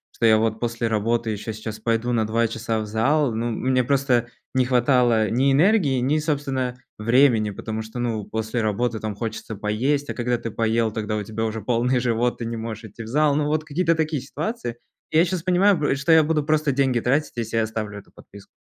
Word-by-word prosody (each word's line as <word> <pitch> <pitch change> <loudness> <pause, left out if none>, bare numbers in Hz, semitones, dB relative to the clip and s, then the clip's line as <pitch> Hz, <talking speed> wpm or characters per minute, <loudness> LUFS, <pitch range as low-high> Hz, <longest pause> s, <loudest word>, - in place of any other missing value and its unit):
что - - 0
я 110 0 +6
вот 110 0 0
после 115 -1 -2
работы 115 +1 0
еще 110 +1 -5
сейчас 110 0 -7
пойду 115 +1 0
на 110 -2 +1
2 115 +1 +1
часа 115 0 -2
в 110 - -3
зал. 125 +5 +1
Ну, 115 +2 -2
мне 130 +2 +1
просто 130 -3 +1 0.3
не 130 -1 +3
хватало 125 -3 +3
ни 135 +4 +3
энергии, 150 - +3
ни, 145 +5 +1
собственно, 135 -5 -2 0.2
времени, 115 -1 +3
потому 110 +2 -5
что, 110 +2 -9
ну, 115 -3 -2
после 110 +2 -3
работы 110 +1 -1
там 110 -2 -4
хочется 110 0 -5
поесть, 130 +8 -1
а - - -4
когда 120 0 -1
ты 115 -1 -6
поел 115 0 +1
тогда, 105 0 -3
у 105 - -3
тебя 110 +2 -4
уже 110 0 -3
полный 125 +3 +1
живот, 120 0 0
ты 115 - -5
не 115 0 -4
можешь 110 0 -6
идти 115 +2 -10
в 110 - -9
зал. 145 +3 +2
Ну, 150 -1 +1
вот 155 +1 0
какие-то 165 +2 +1
такие 155 -4 -1
ситуации. 145 - -4 0.4
Я 160 +2 +4
сейчас 180 -1 -3
понимаю 185 +1 +4
п 145 -2 +1
что 140 +4 0
я 160 -1 +7
буду 155 -1 0
просто 155 -1 +1
деньги 130 -2 +1
тратить, 140 +6 0
если 115 -1 -3
я 115 - +3
оставлю 110 -1 -4
эту - - -19
подписку. 100 -1 -15
120 Hz, 215 wpm, -23 LUFS, 110-140 Hz, 0.4 s, я